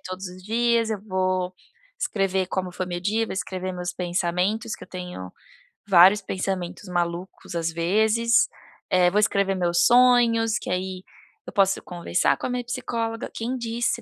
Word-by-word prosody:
todos 185 +1 -6
os 180 +1 -12
dias, 230 +2 +1
eu 210 - -2
vou 185 -2 -1 0.5
escrever 195 - 0
como 185 0 -3
foi 185 0 -3
meu 175 -1 -4
dia, 215 +5 0
vou - - -5
escrever 185 -1 -4
meus 180 0 -4
pensamentos 180 +5 -1
que - - -11
eu - - -23
tenho 180 - -7 0.6
vários 190 +2 +7
pensamentos 185 -1 -4
malucos, 175 +1 -3
às 165 0 -1
vezes, 220 +7 +3 0.4
eh, 180 -1 +4
vou 210 - +3
escrever 200 -2 +2
meus 175 -2 +2
sonhos 235 -3 +5
que - - -7
aí 185 0 -3 0.4
eu - - -9
posso 195 -2 +2
conversar 175 0 0
com - - -3
a - - -5
minha 245 0 -2
psicóloga. 230 -2 -3
Quem 245 +3 -3
disse 235 0 -1
190 Hz, 165 wpm, -24 LUFS, 180-225 Hz, 0.6 s, vários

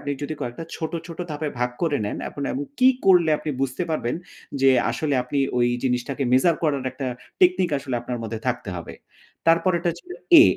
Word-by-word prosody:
আপনি 145 - -4
যদি 145 +2 -3
কয়েকটা 120 +7 -4
ছোট, 160 - -4
ছোট 165 -2 -9
ধাপে 150 0 -2
ভাগ 125 0 +1
করে 155 -4 +2
নেন 105 - -3
এখন 140 - -7
এমন 280 +2 -2
কি 255 - +7 0.2
করলে 180 -4 +6
আপনি 155 - -4
বুঝতে 135 +5 -1
পারবেন 125 -6 -1 0.5
যে 135 - +6 0.2
আসলে 140 +5 -1
আপনি 125 +3 -3 0.2
ওই 120 - +4 0.2
জিনিসটাকে 125 +2 -1
measure 155 +6 +4
করার 140 -4 +1
একটা 130 +1 -4 0.3
technique 180 -3 +4
আসলে 135 -2 -4
আপনার 120 0 -4
মধ্যে 115 0 -4
থাকতে 125 -4 -1
হবে। 85 - -8 0.5
তারপরেরটা 170 +1 +3
হচ্ছে 170 - -11 0.3
এ - - +11
145 Hz, 185 wpm, -24 LUFS, 125-165 Hz, 0.5 s, এ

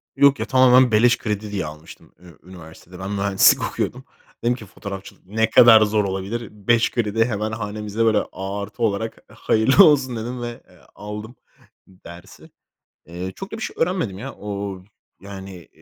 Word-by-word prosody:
Yok 140 0 +4
ya, - - -2
tamamen 130 -1 +5
beleş 115 +3 +4
kredi 105 -1 -4
diye 100 -4 -3
almıştım 75 +1 -12
ü 85 -4 -17
üniversitede. 90 0 -13
Ben 95 +1 -5
mühendislik 100 -1 +3
okuyordum. - - -4 0.4
Dedim 120 +1 +2
ki 115 - -11
fotoğrafçılık 100 0 -10
ne 110 +4 0
kadar 110 -1 +8
zor 105 0 +2
olabilir. 100 +4 -4
5 115 +3 +1
kredi 115 -1 0
hemen 110 -2 -3
hanemizde, 105 0 -3
böyle, 110 -2 +3
artı 100 +4 -6
olarak 110 +1 -1 0.2
hayırlı 130 - +4
olsun 135 -5 +3
dedim 120 +2 -5
ve, 120 -1 -6
eee, - - -21 0.2
aldım 105 +3 -8 0.5
dersi. 90 -2 -14 0.6
Eee, 90 +3 -6
çok 195 - -9
da - - -4
bir 220 - -8
şey - - -5
öğrenmedim, 165 - -1
ya. 135 +5 -7
O, 100 -2 -6 0.4
yani, 95 -3 -10
105 Hz, 160 wpm, -21 LUFS, 95-120 Hz, 0.6 s, kadar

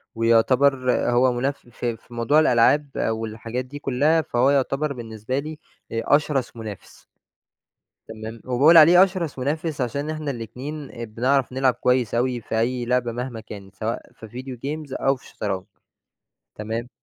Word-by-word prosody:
ويُعتبر 125 +3 +3 0.2
هو 125 +1 +4
مناف 135 +4 -1
في 120 -1 -3
في 120 - -18
موضوع 120 +6 +3
الألعاب 145 +1 +4
والحاجات 115 +2 -3
دي 145 +3 -9
كلّها، 145 +5 +2
فهو 125 -2 +1
يُعتبر 140 +1 0
بالنسبة 115 +1 -4
لي 155 +1 -7 0.3
آآ، 115 0 -2
أشرَس 145 -5 -1
منافس. 105 -4 -9 1.0
تمام؟ 110 0 -8
وباقول 140 +7 +5
عليه 175 +4 +9
أشرَس 175 -7 -2
منافس 150 +2 -2
عشان 140 +5 -2
إحنا 155 -2 -3
الاتنين، 130 +5 -7
آآ 115 - -6
بنعرَف 125 +4 0
نلعب 130 -1 +2
كويّس 125 -3 +1
أوي 125 0 0
في 110 +1 -2
أي 120 +1 0
لعبة 125 -1 +1
مهما 120 0 -5
كانت، 100 -3 -11
سواء 110 +4 -4
في 110 - -12
video 125 +3 -8
games 150 -2 -5
أو 135 0 +4
في 130 - -18
الشطرنج. 95 -3 -4 0.9
تمام؟ 110 +3 -4
125 Hz, 150 wpm, -23 LUFS, 115-140 Hz, 1.0 s, عليه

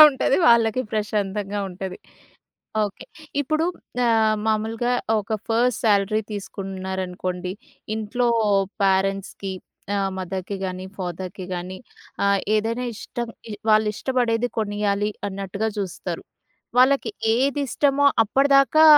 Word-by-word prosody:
ప్రశాంతంగా - - +15
ఉంటది 265 0 +1
వాళ్ళకి 235 +1 +4
ప్రశాంతంగా 205 -1 -1
ఉంటది. 185 0 -6 0.9
ఓకే. 205 - -5 0.4
ఇప్పుడు 310 +3 0 0.4
ఆహ్, 220 -2 +4
మామూలుగా 225 +3 +1 0.3
ఒక 210 +2 -4
ఫస్ట్ 230 0 +2
శాలరీ 210 +1 +3
తీసుకుంటున్నారనుకోండి, 190 -2 -4 0.4
ఇంట్లో 230 +3 0 0.6
పేరెంట్స్‌కి 195 0 0 0.4
ఆహ్, 195 -1 0
మదర్‍కి 190 +1 -4
కానీ, 185 0 -4
ఫాదర్‍కి 185 +1 -5
కానీ 180 +2 -5 0.5
ఆహ్ 200 0 +4 0.2
ఏదైనా 230 +3 0
ఇష్టం 240 +1 -5 0.4
వాళ్ళు 215 0 +5
ఇష్టపడేది 245 -2 +1
కొనియాలి 205 0 0 0.2
అన్నట్టుగా 200 +3 -3
చూస్తారు. 190 -3 -4 0.5
వాళ్ళకి 260 -2 +5 0.3
ఏదిష్టమో 280 +1 +2 0.2
అప్పటిదాకా 275 +5 +5
210 Hz, 100 wpm, -23 LUFS, 195-240 Hz, 0.9 s, ప్రశాంతంగా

